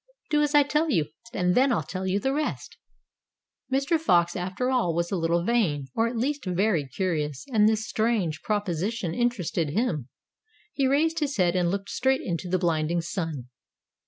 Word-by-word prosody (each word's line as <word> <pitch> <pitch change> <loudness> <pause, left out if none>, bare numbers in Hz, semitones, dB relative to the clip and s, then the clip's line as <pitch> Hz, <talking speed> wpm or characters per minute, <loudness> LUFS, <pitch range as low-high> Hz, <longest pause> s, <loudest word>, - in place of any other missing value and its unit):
"Do 300 -1 +3
as 295 0 +1
I 290 - +7
tell 300 +3 0
you, 160 - +1 0.2
and 180 -2 +1
then 260 +4 +4
I'll 235 - +1
tell 190 0 -4
you 190 +2 +1
the 270 +4 0
rest." 300 +2 -3 1.0
Mr. 275 +5 +2
Fox, 175 - +3
after 190 +8 -2
all, 230 -11 +1
was 170 0 -1
a - - +1
little 170 0 +1
vain, 175 - 0
or 225 +1 +2
at 235 0 -4
least 280 +4 -1
very 180 -5 +1
curious, 150 -2 -2
and 215 -1 +5
this 215 -1 -1
strange 215 -9 0
proposition 200 -2 -2
interested 195 -10 0
him. 155 - -1 0.6
He 275 -2 +1
raised 320 +4 +2
his 290 -4 -2
head, 180 -2 +2
and 175 -2 +2
looked 195 +2 -3
straight 265 +1 +1
into 175 0 -3
the 185 - +2
blinding 170 -1 0
sun. 160 -7 -4
195 Hz, 180 wpm, -26 LUFS, 170-250 Hz, 1.0 s, I